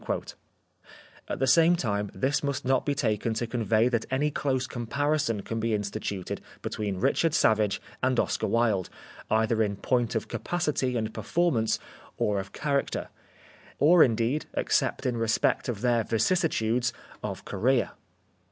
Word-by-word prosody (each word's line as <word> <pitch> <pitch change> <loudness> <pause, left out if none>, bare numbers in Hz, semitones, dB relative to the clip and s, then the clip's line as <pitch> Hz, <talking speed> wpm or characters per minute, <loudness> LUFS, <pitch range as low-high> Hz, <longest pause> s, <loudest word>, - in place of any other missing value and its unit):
At - - -3
the 135 - +1
same 165 +6 +5
time 105 - -1
this 135 +2 +1
must 140 -3 -2
not 130 +2 +1
be 145 - +1
taken 110 -3 0
to 120 - -1
convey 115 -1 +2
that 120 -3 -1
any 145 +3 +1
close 135 -3 0
comparison 135 -1 -1
can 115 - -3
be 110 0 +1
in 105 - -1
stituted 100 -2 -4 0.2
between 100 -3 -3
Richard 150 - +2
Savage 110 -6 +3 0.2
and 130 -1 +2
Oscar - - 0
Wilde, 110 -6 +1 0.4
either 110 +1 +2
in 100 -2 0
point 120 +2 0
of 110 - -1
capacity 150 -8 -1
and 110 -1 -2
perform 165 - 0
ance, 110 0 +1 0.4
or 105 -1 +1
of 95 +1 -7
character, 140 -1 -1 0.7
or 165 +4 +6
indeed, 120 +5 0
except - - 0
in 125 -2 0
re 115 0 0
spect 110 - +1
of 110 -4 -3
their 120 -2 +2
vicissitudes, 120 - +1 0.3
of - - -5
career. 130 +1 +1
120 Hz, 150 wpm, -27 LUFS, 110-140 Hz, 0.7 s, or